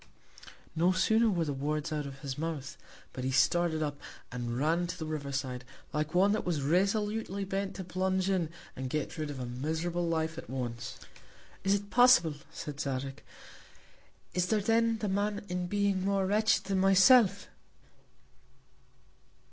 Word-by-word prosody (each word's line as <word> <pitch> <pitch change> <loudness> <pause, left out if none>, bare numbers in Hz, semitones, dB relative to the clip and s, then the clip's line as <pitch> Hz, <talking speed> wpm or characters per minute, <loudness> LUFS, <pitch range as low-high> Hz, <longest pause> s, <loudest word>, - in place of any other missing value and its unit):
No 170 +3 +3
sooner 220 +4 +3
were 170 -5 0
the 145 - -2
Words 150 +3 -2
out 150 -2 -2
of 135 0 -10
his 135 -3 -4
Mouth, 150 -2 -4 0.4
but 130 - -5
he 130 - 0
started 160 +3 +2
up, 145 -1 -3 0.3
and 120 -1 -3
ran 165 +5 +1
to 180 - -5
the 160 - -4
River 150 -3 -4
side, 130 -2 -3 0.3
like 155 +2 -2
one 195 +3 +5
that 215 - 0
was 160 -6 -1
resolutely 200 +4 0
bent 195 0 -3
to 190 - -5
plunge 185 +1 0
in, 185 -5 +1 0.3
and 130 0 -4
get 155 +3 -3
rid 155 -1 -2
of 140 -2 -6
a 125 - -3
miserable 160 +7 -2
Life 160 0 -1
at - - -11
once. 120 -3 -4 0.7
Is 195 +1 +3
it 200 0 -5
possible, 245 -11 +6 0.2
said 150 -4 -7
Zadig? 135 -2 -3 1.1
Is 180 0 +1
there 215 +1 +2
then 225 +2 +2
the 215 - -3
Man 205 +1 -1
in 180 0 -2
Being 200 -1 +1
more 195 0 +1
wretched 215 +3 +2
than 195 -1 0
myself? 195 +2 +5
175 Hz, 165 wpm, -31 LUFS, 145-195 Hz, 1.1 s, possible